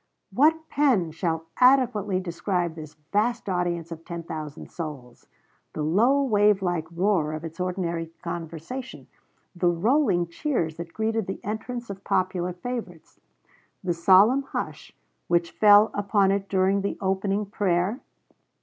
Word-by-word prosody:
What 315 Hz, +7 st, +3 dB
pen 250 Hz, -, +2 dB
shall 165 Hz, 0 st, -2 dB
adequately 250 Hz, -7 st, +4 dB
describe 175 Hz, -1 st, -2 dB
this 155 Hz, -2 st, -10 dB, 0.2 s
vast 235 Hz, +3 st, +1 dB
audience 175 Hz, -3 st, -1 dB
of 165 Hz, 0 st, -8 dB
ten 170 Hz, 0 st, -6 dB
thousand 155 Hz, -2 st, -7 dB
souls? 145 Hz, -8 st, -8 dB, 0.5 s
the 155 Hz, -, -3 dB
low, 235 Hz, -, +3 dB
wavelike 195 Hz, -7 st, +2 dB
roar 170 Hz, -3 st, +1 dB
of 155 Hz, +1 st, -5 dB
its 165 Hz, +1 st, -8 dB
ordinary 175 Hz, -2 st, -2 dB, 0.2 s
conversation; 170 Hz, +9 st, -6 dB, 0.5 s
the 175 Hz, 0 st, +2 dB
rolling 195 Hz, -, +2 dB
cheers 170 Hz, -, -2 dB
that 170 Hz, 0 st, -7 dB
greeted 220 Hz, 0 st, -1 dB
the 190 Hz, -, -4 dB
entrance 235 Hz, +2 st, -5 dB
of 195 Hz, 0 st, -9 dB
popular 185 Hz, -1 st, 0 dB
favorites; 185 Hz, -5 st, -7 dB, 0.6 s
the 180 Hz, -2 st, 0 dB
solemn 195 Hz, +10 st, +5 dB
hush 275 Hz, -, -6 dB, 0.4 s
which 170 Hz, -1 st, +1 dB
fell 210 Hz, 0 st, +6 dB
upon 200 Hz, -1 st, +2 dB
it 195 Hz, 0 st, -1 dB
during 195 Hz, +1 st, +2 dB
the 200 Hz, -, -3 dB
opening 195 Hz, +2 st, 0 dB
prayer? 195 Hz, +2 st, 0 dB
190 Hz, 130 wpm, -25 LUFS, 170-215 Hz, 0.6 s, fell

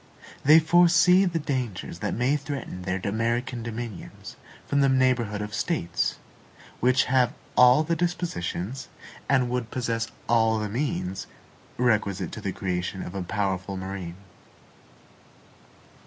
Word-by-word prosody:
They 155 Hz, +3 st, +8 dB
foresee 175 Hz, +3 st, +5 dB
the 175 Hz, -2 st, 0 dB
dangers 125 Hz, -, -3 dB
that -, -, -2 dB
may 125 Hz, +5 st, +2 dB
threaten 140 Hz, -9 st, -5 dB
their 90 Hz, +1 st, -2 dB
American 115 Hz, +4 st, -1 dB
dominions 115 Hz, -3 st, -7 dB, 0.3 s
from 140 Hz, 0 st, +1 dB
the 135 Hz, -, +4 dB
neighborhood 125 Hz, -6 st, +2 dB
of 105 Hz, 0 st, -7 dB
States, 105 Hz, -, -1 dB, 0.6 s
which 130 Hz, +1 st, +4 dB
have 125 Hz, -1 st, +2 dB, 0.2 s
all 125 Hz, +4 st, +7 dB
the 170 Hz, +2 st, 0 dB
dispositions, 135 Hz, -, -3 dB, 0.4 s
and 130 Hz, -3 st, +3 dB
would 125 Hz, -2 st, -2 dB
possess 115 Hz, -3 st, -2 dB, 0.2 s
all 115 Hz, -1 st, +3 dB
the 105 Hz, -1 st, -2 dB
means, 105 Hz, -6 st, -2 dB, 0.5 s
requisite 110 Hz, -6 st, +1 dB
to -, -, -7 dB
the -, -, -2 dB
creation 90 Hz, 0 st, -3 dB
of -, -, -7 dB
a 100 Hz, -, -3 dB
powerful 95 Hz, 0 st, -2 dB
marine. 95 Hz, -2 st, -6 dB
120 Hz, 125 wpm, -26 LUFS, 100-135 Hz, 0.6 s, They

